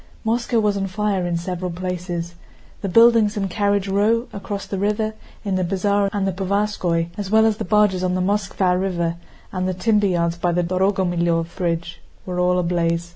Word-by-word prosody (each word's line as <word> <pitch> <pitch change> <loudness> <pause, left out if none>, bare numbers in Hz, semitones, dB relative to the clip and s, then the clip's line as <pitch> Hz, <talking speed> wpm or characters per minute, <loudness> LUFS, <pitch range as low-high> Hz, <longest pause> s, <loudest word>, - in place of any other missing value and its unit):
Moscow 235 +1 +1
was 210 -2 +1
on 195 -1 -1
fire 195 -2 -1
in 170 -1 -1
several 180 +1 -4
places. 175 -1 -4 0.5
The 195 - -2
buildings 230 0 +5
in 195 -1 0
Carriage 200 0 0
Row, 215 +4 +2
across 200 0 -5
the 195 - -4
river, 210 +2 0 0.3
in 195 -2 0
the 185 - 0
Bazaar 200 +2 +1
and 200 -1 -1
the 190 - -1
Povarskóy, 190 -3 0
as 200 -2 -3
well 220 +1 +5
as 220 -2 +2
the - - -4
barges 205 -3 +3
on 180 0 0
the - - 0
Moskvá 190 -2 +1
River 170 -3 -1 0.3
and 185 0 -2
the 185 - -1
timber 210 +1 +2
yards 170 -2 0
by 175 0 +1
the 175 +1 +1
Dorogomílov 175 -2 0
Bridge, 175 0 -3 0.2
were 180 -1 -3
all 180 0 +2
ablaze. 170 -1 0
190 Hz, 185 wpm, -21 LUFS, 175-205 Hz, 0.5 s, buildings